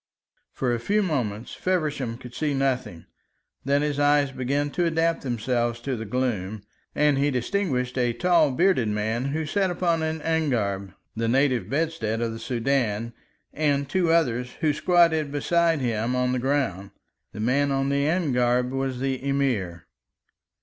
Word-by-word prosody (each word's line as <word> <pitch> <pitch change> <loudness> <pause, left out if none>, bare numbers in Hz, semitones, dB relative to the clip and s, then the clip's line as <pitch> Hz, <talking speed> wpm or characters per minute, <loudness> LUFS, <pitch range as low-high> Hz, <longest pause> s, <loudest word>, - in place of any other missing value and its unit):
For 125 -2 -1
a 120 - -1
few 205 - +1
moments 120 - -2
Feversham 150 -10 -1
could 125 -1 -11
see 150 0 -1
nothing. 130 -10 -1 0.6
Then 140 +2 +2
his 145 -1 -1
eyes 145 -1 +3
began 140 +3 -1
to 175 - 0
adapt 165 0 +1
themselves 120 -1 -1
to 130 +1 -2
the 110 -1 -5
gloom, 110 -4 -2 0.3
and 150 -2 +3
he 145 +1 +2
distinguished 125 -2 -1
a 120 -1 +2
tall, 170 +2 +3
bearded 160 - +2
man, 110 +4 -1
who 155 +3 -2
sat 190 +5 0
upon 170 -2 0
an 160 0 -2
angareb, 110 - -1 0.2
the 115 0 -1
native 130 0 +2
bedstead 140 -7 -1
of 115 -1 -1
the 115 - -7
Soudan, 115 -3 -1 0.4
and 140 -2 0
two 175 +1 +1
others, 125 -7 +1
who 155 -2 +2
squatted 160 -1 +3
beside 165 +2 +1
him 115 0 -1
on 125 0 +1
the 130 - 0
ground. 130 -8 -1 0.4
The - - -9
man 135 +6 +2
on 135 0 0
the 140 +1 +1
angareb 125 -7 +1
was 135 -1 -2
the 135 -1 -2
Emir. 125 - -1
135 Hz, 155 wpm, -25 LUFS, 120-155 Hz, 0.6 s, eyes